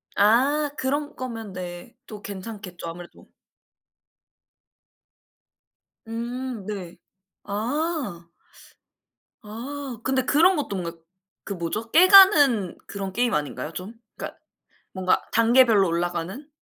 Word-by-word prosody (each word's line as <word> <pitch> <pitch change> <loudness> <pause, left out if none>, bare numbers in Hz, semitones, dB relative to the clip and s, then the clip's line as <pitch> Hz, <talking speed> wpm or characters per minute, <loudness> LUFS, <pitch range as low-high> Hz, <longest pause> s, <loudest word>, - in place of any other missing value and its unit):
아. 270 +8 +3
그런 285 +3 -2
거면 225 -6 -6
네. 175 +4 -8
또 210 -2 -10
괜찮겠죠, 195 -3 -8
아무래도. 175 +1 -11 2.8
음 235 -1 -5
네. 190 -5 -6 0.5
아. 230 - -3 1.2
아. 250 +4 -6
근데 260 0 +1
그런 355 +6 +5
것도 275 -9 -3
뭔가 170 -2 -5 0.5
그 200 - -5
뭐죠? 190 +6 -4
깨 360 +3 +7
가는 290 - +7
그런 195 -1 -5
게임 240 +2 +1
아닌가요 150 +1 -3
좀? 190 +5 -6 0.2
그러니까 - - -7 0.6
뭔가 185 -1 +1
단계별로 230 -4 +5
올라가는. 175 - -3
225 Hz, 200 characters per minute, -24 LUFS, 185-265 Hz, 2.8 s, 깨